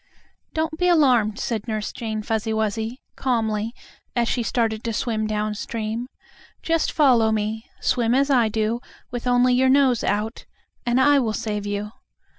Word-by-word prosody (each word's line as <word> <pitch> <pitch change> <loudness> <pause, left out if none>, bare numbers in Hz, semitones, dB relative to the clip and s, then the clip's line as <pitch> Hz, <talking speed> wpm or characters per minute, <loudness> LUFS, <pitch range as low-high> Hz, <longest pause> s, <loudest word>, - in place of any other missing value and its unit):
"Don't 315 0 -1
be 360 - +2
alarmed," 250 -11 +4
said 230 -3 -3
Nurse 215 -2 -2
Jane 220 -2 -4
Fuzzy 220 0 -1
Wuzzy, 220 +3 -2
calmly, 225 -4 0 0.4
as 235 -1 +2
she 245 - 0
started 225 -2 0
to 230 - -2
swim 220 -1 -1
down 215 0 -1
stream. 225 +2 -4 0.6
"Just 330 -1 +1
follow 245 -7 +4
me; 220 +1 -2
swim 240 -1 +2
as 280 +2 +2
I 240 -4 +4
do, 220 +2 0 0.3
with 245 0 -4
only 250 0 +4
your 260 +1 +4
nose 265 -3 +4
out, 210 +3 -2 0.4
and 240 +2 +3
I 285 +1 +5
will 225 -4 0
save 210 -2 -3
you." 205 +1 -3
230 Hz, 160 wpm, -23 LUFS, 215-250 Hz, 0.6 s, I